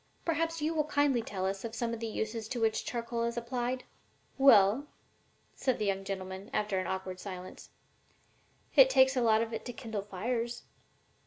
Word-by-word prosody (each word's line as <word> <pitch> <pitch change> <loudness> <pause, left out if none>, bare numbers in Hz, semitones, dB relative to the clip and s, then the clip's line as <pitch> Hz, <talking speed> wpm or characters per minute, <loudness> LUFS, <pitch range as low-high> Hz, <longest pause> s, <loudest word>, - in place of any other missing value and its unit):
Perhaps 330 -1 0
you 315 +2 +1
will 305 -2 +1
kindly 285 -4 +2
tell 190 -4 -4
us 195 0 -2
of 230 -1 -5
some 235 0 -1
of 230 - -4
the 230 - -3
uses 220 0 -3
to 245 +1 -3
which 220 -1 +1
charcoal 235 -1 -3
is 235 0 -1
applied?" 245 +2 -2 0.5
"Well," 260 0 +6 0.7
said 260 -2 0
the 210 - -1
young 195 -1 0
gentleman, 190 +1 -5
after 210 -2 0
an 185 - -3
awkward 190 -1 -4
silence, 185 -2 -8 1.1
"it - - +8
takes 265 - +5
lots 225 -3 +4
of 230 0 -6
it 225 - -4
to 245 - -5
kindle 225 -5 -4
fires." 230 +5 -3
230 Hz, 175 wpm, -31 LUFS, 200-255 Hz, 1.1 s, it